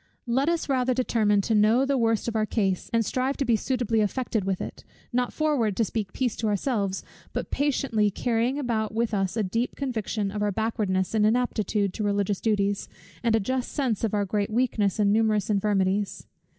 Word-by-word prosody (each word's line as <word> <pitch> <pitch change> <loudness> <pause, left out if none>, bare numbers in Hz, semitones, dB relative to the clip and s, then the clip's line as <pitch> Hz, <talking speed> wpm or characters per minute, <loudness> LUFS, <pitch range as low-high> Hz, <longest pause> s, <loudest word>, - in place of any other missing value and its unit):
Let 260 +5 +1
us 340 -1 -1
rather 255 -2 +1
determine 215 -5 +2
to 225 - -1
know 220 +5 +4
the 280 0 +1
worst 225 -3 +1
of 230 - -2
our 215 -1 +1
case, 195 -5 -1
and 230 -1 +2
strive 260 +4 -1
to 275 - 0
be 235 -2 +3
suitably 230 -1 0
affected 220 -1 -1
with 190 -1 -1
it; - - -7 0.3
not 245 0 +1
forward 275 -10 0
to 225 - +3
speak 210 -3 -3
peace 250 -4 -1
to 225 - -1
ourselves, 205 -2 -1 0.3
but - - -4
patiently 265 -7 +1
carrying 235 +5 0
about 220 -6 -1
with 230 0 0
us 195 +1 0
a 220 - +2
deep 230 +6 -1
conviction 220 -6 -2
of 210 +1 -4
our 205 0 +1
backwardness 200 -3 -1
and 215 -1 +3
inaptitude 215 -3 +1
to 215 - -3
religious 200 -1 0
duties, 205 -2 0 0.3
and 225 +1 +2
a - - +3
just 255 +4 -2
sense 255 -8 -1
of 215 -2 0
our 205 -1 +1
great 205 +1 -1
weakness 220 -4 +1
and 205 -1 +3
numerous 215 -2 +2
infirmities. 200 -1 0
220 Hz, 195 wpm, -26 LUFS, 205-245 Hz, 0.3 s, know